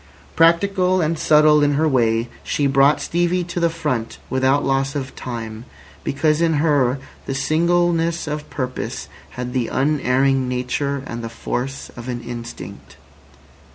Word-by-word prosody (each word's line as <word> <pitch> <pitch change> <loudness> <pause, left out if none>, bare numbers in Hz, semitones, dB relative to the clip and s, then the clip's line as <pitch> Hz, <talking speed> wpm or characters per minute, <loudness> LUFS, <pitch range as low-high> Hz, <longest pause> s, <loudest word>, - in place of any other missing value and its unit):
Practical 185 +3 +3
and 165 -1 0
subtle 150 0 +5
in 145 0 +3
her 155 +3 +2
way, 115 -4 +2 0.2
she 145 - 0
brought 140 +1 +4
Stevie 175 +1 0
to 175 0 -4
the 170 0 +3
front 125 -8 -3
without 130 +2 +2
loss 135 0 0
of 135 -2 -4
time, 115 -2 -6 0.4
because 155 +3 +1
in 165 -1 +3
her 145 -4 +2 0.3
the 135 - -2
singleness 170 +3 +1
of 150 -1 -5
purpose 130 -2 -4 0.3
had 125 0 -4
the 125 -3 0
unerring 135 -2 +1
nature 130 +2 -2
and 120 0 -6
the 115 - -4
force 125 +3 -4
of 120 +1 -8
an 120 -1 -4
instinct. 120 -1 -8
140 Hz, 145 wpm, -21 LUFS, 125-160 Hz, 0.4 s, subtle